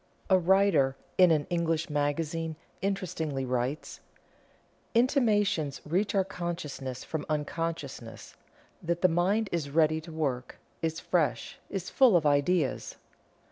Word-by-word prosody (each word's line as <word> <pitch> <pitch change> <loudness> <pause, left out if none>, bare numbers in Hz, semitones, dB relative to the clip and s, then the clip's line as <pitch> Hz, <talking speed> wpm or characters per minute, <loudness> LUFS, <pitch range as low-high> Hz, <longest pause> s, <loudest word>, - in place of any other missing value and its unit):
A 190 - +7
writer 180 -7 +3 0.2
in 180 -1 +8
an 155 -3 +2
English 165 -1 0
magazine 155 +2 -1 0.3
interestingly 160 -8 -2
writes: 125 +4 -2 1.0
"Intimations 210 - +2
reach 185 +7 0
our 195 - +4
consciousness 150 -8 -5
from 155 -2 -4
unconsciousness, 150 -6 -4 0.5
that 170 +1 -2
the - - +8
mind 185 +6 +1
is 160 -5 -2
ready 155 +1 +2
to 165 +1 -11
work, 135 -6 -3 0.2
is 160 0 -1
fresh, 165 -5 -1
is 190 -2 -4
full 250 -9 +6
of 160 - -1
ideas." 145 +1 +1
165 Hz, 120 wpm, -29 LUFS, 145-180 Hz, 1.0 s, in